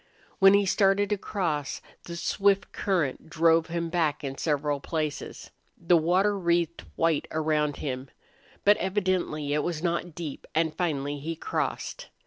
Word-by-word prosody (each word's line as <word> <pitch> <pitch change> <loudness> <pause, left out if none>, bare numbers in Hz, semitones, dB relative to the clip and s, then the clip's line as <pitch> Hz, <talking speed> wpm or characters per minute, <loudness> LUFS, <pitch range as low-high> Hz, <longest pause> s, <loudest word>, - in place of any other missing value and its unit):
When 195 0 +8
he 200 0 +3
started 195 +1 +3
to 210 - +2
cross, 160 -9 -2 0.3
the 170 - -6
swift 195 +3 +1
current 165 -6 -1
drove 165 0 +3
him 170 -1 -3
back 160 -4 0
in 135 -1 -4
several 145 -1 0
places. 155 0 -4 0.3
The 170 +1 +3
water 180 +5 +3
wreathed 170 -2 0
white 165 -3 +1
around 155 -2 +1
him. 130 -1 -4 0.6
But 205 +1 +6
evidently 185 -7 -1
it 150 - +2
was 165 0 -3
not 170 -1 -1
deep, 160 -5 -6
and 160 -1 +1
finally 145 -5 -1
he 165 +4 -4
crossed. - - -3
165 Hz, 145 wpm, -27 LUFS, 150-185 Hz, 0.6 s, When